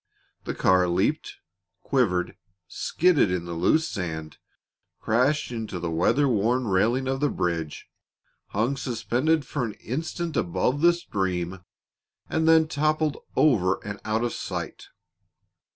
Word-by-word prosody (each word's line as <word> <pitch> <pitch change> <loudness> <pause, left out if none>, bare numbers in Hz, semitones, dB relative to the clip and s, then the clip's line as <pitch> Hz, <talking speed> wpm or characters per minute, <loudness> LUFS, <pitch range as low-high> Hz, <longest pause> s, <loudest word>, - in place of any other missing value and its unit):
The - - -3
car 90 -1 +3
leaped, 85 - 0 0.5
quivered, 100 -10 +1 0.3
skidded 175 - +2
in 90 -1 -2
the 85 - -5
loose 155 - +2
sand, 80 - -5 0.6
crashed 130 +6 +1
into 110 -5 -4
the 85 -1 -3
weather 110 - +2
worn 120 +2 +1
railing 115 +7 +2
of 135 0 -1
the 145 +1 +2
bridge, 85 - -3 0.6
hung 120 +7 -1
suspended 130 +5 0
for 140 0 -3
an 110 -3 -3
instant 160 - -4
above 100 - 0
the 170 +1 +6
stream, 95 - -3 0.7
and 160 0 0
then 160 -1 +6
toppled 155 0 0 0.2
over 95 -11 +3
and 100 -1 -5
out 110 +2 0
of 120 - -1
sight. - - -5
115 Hz, 130 wpm, -25 LUFS, 90-145 Hz, 0.7 s, the